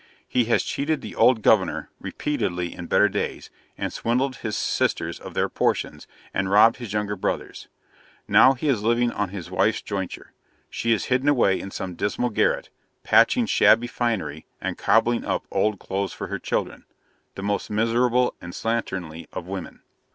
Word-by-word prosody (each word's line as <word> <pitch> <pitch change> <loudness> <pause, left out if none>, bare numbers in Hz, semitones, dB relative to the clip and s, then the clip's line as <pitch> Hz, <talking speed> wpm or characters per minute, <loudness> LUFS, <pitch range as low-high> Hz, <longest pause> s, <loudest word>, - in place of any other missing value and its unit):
He 125 -2 +1
has 115 - +2
cheated 150 +1 -1
the - - -8
old 115 -4 +4
'governor' 95 -5 +2
repeatedly 90 - -3
in 90 - -7
better - - +4
days, - - -4 0.3
and - - -3
swindled 130 +3 0
his 110 -2 -3
sisters - - -1
of - - -10
their - - +2
portions, - - -1 0.3
and 95 0 -1
robbed 105 +3 +6
his 120 -5 -7
younger 105 0 -1
brothers. 95 - -4 0.6
Now 130 - +6
he 135 +4 -4
is 125 -7 +2
living 120 +2 +2
on 105 -2 -2
his 90 -2 -8
wife's 95 +4 +1
jointure: 95 -3 -5 0.4
she 115 - -1
is 110 -4 +1
hidden 130 +3 +2
away 120 -9 +3
in 95 - -6
some 95 -1 -5
dismal 105 +7 -1
garret, - - 0 0.3
patching 245 -2 +4
shabby 120 - +4
finery 115 -10 -2
and - - -3
cobbling 115 +1 +2
up - - -2
old 105 -1 +1
clothes 95 0 -3
for - - -6
her - - -3
children - - -3 0.5
the 95 - -6
most 100 0 -1
miserable 120 +3 +2
and 85 0 -8
slatternly 95 -8 -3
of 85 - -6
women. 95 -1 -7
110 Hz, 165 wpm, -24 LUFS, 95-120 Hz, 0.6 s, robbed